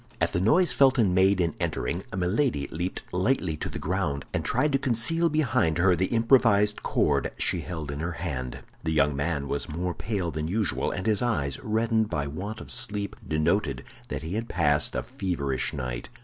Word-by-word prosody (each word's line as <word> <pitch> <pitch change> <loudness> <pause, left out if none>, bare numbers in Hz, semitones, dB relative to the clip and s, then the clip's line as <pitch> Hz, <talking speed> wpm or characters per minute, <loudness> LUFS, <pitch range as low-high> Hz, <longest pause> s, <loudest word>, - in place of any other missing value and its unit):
At - - +1
the 90 - +1
noise 165 - +4
Felton 130 -8 +4
made 95 +1 +4
in 85 -3 +1
entering, 85 - -2 0.2
Milady 95 - +1
leaped 90 +4 -3
lightly 90 -3 +1
to - - -4
the - - -5
ground, 75 -6 -2
and - - -1
tried 150 - +1
to 135 - +2
conceal 135 +8 +2
behind 125 - +1
her 90 +1 +4
the 95 +2 +1
improvised 115 -3 +3
cord - - +1
she - - 0
held 80 -5 -5
in 70 - -5
her 85 +2 -2
hand. 70 -7 -4 0.2
The 80 -1 0
young 75 -2 +3
man 70 0 -1
was 70 - -2
more 90 +4 -2
pale 95 -4 -2
than 80 0 -3
usual, 105 +2 0
and 95 - -4
his 110 -3 +2
eyes, 80 - 0
reddened 110 0 +1
by 70 -1 -1
want 100 +10 -5
of - - -7
sleep, 100 -1 -2
denoted 80 +7 0 0.2
that - - -4
he 80 +3 -4
had 115 +2 -3
passed 75 -4 +1
a - - -1
feverish 70 -8 -2
night. 60 -3 -5
90 Hz, 190 wpm, -27 LUFS, 75-110 Hz, 0.2 s, noise